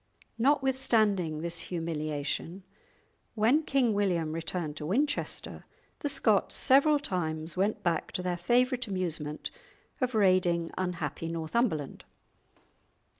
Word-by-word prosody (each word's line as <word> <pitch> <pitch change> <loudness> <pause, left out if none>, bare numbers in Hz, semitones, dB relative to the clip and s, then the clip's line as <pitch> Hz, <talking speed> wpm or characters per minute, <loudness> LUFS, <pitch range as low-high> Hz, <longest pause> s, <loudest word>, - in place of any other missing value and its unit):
Notwithstanding 225 - +2
this 170 0 -1
humiliation, 160 +1 -3 0.7
when 235 +8 +4
King 270 -7 +2
William 180 -6 0
returned 165 -1 -3
to 150 - -5
Winchester, 280 - -1 0.4
the 290 - -1
Scots 225 -7 +2
several 280 +3 +5
times 165 - -3
went 200 +3 0
back 170 -2 0
to 180 - -2
their 180 -1 -1
favourite 250 +6 +1
amusement 165 -6 -3 0.5
of 255 -2 0
raiding 180 -4 +3
unhappy 170 -4 -3
Northumberland. 165 - -1
185 Hz, 105 wpm, -29 LUFS, 165-240 Hz, 0.7 s, several